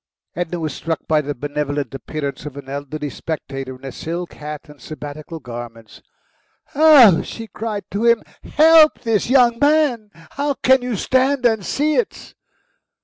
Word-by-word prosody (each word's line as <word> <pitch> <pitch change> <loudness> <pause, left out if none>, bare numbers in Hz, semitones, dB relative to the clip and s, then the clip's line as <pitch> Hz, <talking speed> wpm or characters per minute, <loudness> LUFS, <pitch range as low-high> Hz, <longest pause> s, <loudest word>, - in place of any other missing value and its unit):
Edna 175 0 -3
was 155 -3 -3
struck 165 -1 -4
by 155 -1 +3
the 145 0 -5
benevolent 145 -1 -3
appearance 140 +1 -5
of 140 -1 -9
an 140 - -9
elderly 145 +2 -5
spectator 135 +1 -6
in 130 +1 -14
a 135 - -5
silk 170 +6 -5
hat 150 +1 -8
and 150 -1 -16
Sabbatical 155 +1 -8
garments. 115 -4 -10 0.7
"Oh!" 280 - +7
she 225 - -8
cried 215 -2 -5
to 205 +5 -1
him. 235 -1 +4 0.2
"Help 315 -1 +5
this 225 -2 0
young 245 -3 +4
man! 285 -7 +2 0.2
How 285 0 -2
can 260 0 +3
you 245 -2 -3
stand 260 +4 +1
and 220 -4 +2
see 300 - 0
it?" 475 - -3
170 Hz, 155 wpm, -20 LUFS, -, 0.7 s, Oh